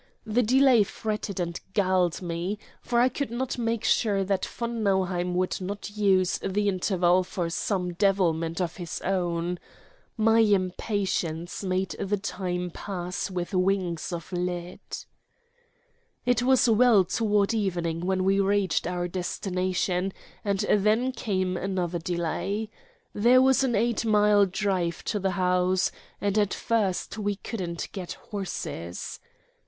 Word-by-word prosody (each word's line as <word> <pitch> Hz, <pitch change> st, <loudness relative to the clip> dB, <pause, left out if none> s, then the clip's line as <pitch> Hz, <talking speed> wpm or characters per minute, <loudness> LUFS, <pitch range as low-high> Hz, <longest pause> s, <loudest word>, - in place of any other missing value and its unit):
The 220 Hz, +2 st, +2 dB
delay 255 Hz, 0 st, +5 dB
fretted 210 Hz, -1 st, -3 dB
and 170 Hz, -1 st, -2 dB, 0.2 s
galled 185 Hz, -3 st, +2 dB
me, 175 Hz, +4 st, -2 dB, 0.2 s
for 240 Hz, -1 st, +1 dB
I 245 Hz, -, +5 dB
could 270 Hz, +2 st, -3 dB
not 245 Hz, +1 st, -3 dB
make 230 Hz, -1 st, -1 dB
sure 200 Hz, -4 st, +2 dB
that 190 Hz, -1 st, 0 dB
von 235 Hz, -1 st, -4 dB
Nauheim 185 Hz, -3 st, +1 dB
would 185 Hz, +1 st, 0 dB
not 200 Hz, +2 st, -5 dB
use 190 Hz, -3 st, +3 dB
the 205 Hz, +2 st, 0 dB
interval 185 Hz, -1 st, +2 dB
for 175 Hz, -2 st, -3 dB
some 180 Hz, -1 st, -1 dB
devilment 170 Hz, -4 st, +1 dB
of 175 Hz, -2 st, -2 dB
his 175 Hz, -3 st, -5 dB
own. 175 Hz, -2 st, -1 dB, 0.6 s
My 225 Hz, +1 st, +4 dB
impatience 185 Hz, -4 st, 0 dB
made 185 Hz, 0 st, -1 dB
the 205 Hz, +1 st, 0 dB
time 180 Hz, -2 st, -3 dB
pass 180 Hz, 0 st, -4 dB
with 180 Hz, 0 st, -4 dB
wings 185 Hz, -3 st, 0 dB
of 170 Hz, +1 st, -6 dB
lead. 180 Hz, -1 st, -3 dB, 1.5 s
It 245 Hz, -1 st, +3 dB
was 255 Hz, 0 st, +4 dB
well 225 Hz, -3 st, +5 dB
toward 210 Hz, +2 st, +1 dB
evening 175 Hz, -6 st, -1 dB
when 185 Hz, 0 st, +1 dB
we 195 Hz, +1 st, +3 dB
reached 195 Hz, -4 st, +1 dB
our 175 Hz, 0 st, -2 dB
destination, 185 Hz, +1 st, -1 dB, 0.3 s
and 200 Hz, -2 st, 0 dB
then 215 Hz, +5 st, +2 dB
came 185 Hz, -7 st, -1 dB
another 180 Hz, -2 st, -2 dB
delay. 180 Hz, +5 st, -2 dB, 0.4 s
There 240 Hz, +5 st, +5 dB
was 265 Hz, +1 st, +4 dB
an 250 Hz, -3 st, +1 dB
eight 235 Hz, +2 st, +1 dB
mile 210 Hz, -2 st, +4 dB
drive 185 Hz, -3 st, -1 dB
to 210 Hz, -, -1 dB
the 190 Hz, 0 st, 0 dB
house, 180 Hz, 0 st, +2 dB, 0.3 s
and 205 Hz, +1 st, +1 dB
at 205 Hz, -2 st, +1 dB
first 215 Hz, -2 st, -1 dB
we 205 Hz, -1 st, 0 dB
couldn't 180 Hz, -5 st, -5 dB
get 185 Hz, -3 st, -5 dB
horses. 90 Hz, -, -5 dB
190 Hz, 135 wpm, -27 LUFS, 180-210 Hz, 1.5 s, delay